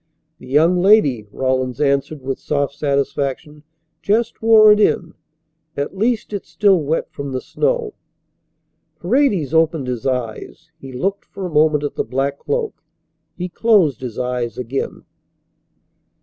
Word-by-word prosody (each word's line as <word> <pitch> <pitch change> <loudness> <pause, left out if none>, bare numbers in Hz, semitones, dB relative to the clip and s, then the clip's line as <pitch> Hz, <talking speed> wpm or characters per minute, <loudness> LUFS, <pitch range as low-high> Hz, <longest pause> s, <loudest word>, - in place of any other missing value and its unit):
"The 125 - -13
young 165 +7 +3
lady," 145 - +4
Rawlins 130 -1 -1
answered 140 0 0
with 135 0 -3
soft 140 -2 -1
satisfaction, 140 0 -2 0.4
"just 220 +3 0
wore 220 -1 +7
it 210 - +4
in. 175 -5 +1 0.6
At 140 +6 -3
least 220 +1 -1
it's 200 -6 -5
still 185 +3 +3
wet 155 +3 -2
from 140 -1 -6
the 130 - -1
snow." 470 - -1 1.1
Paredes 205 - +1
opened 160 -3 +2
his 125 -1 -3
eyes. 125 +5 -4
He 135 -2 -10
looked 195 +11 -3
for 195 -2 -7
a 180 - -5
moment 150 -1 +3
at 145 - -3
the - - -2
black 135 +4 -2
cloak. 460 -1 -3 0.6
He 180 - -3
closed 185 - +2
his 120 -3 -6
eyes 125 -2 -3
again. 125 +2 -4
150 Hz, 140 wpm, -19 LUFS, 130-195 Hz, 1.1 s, wore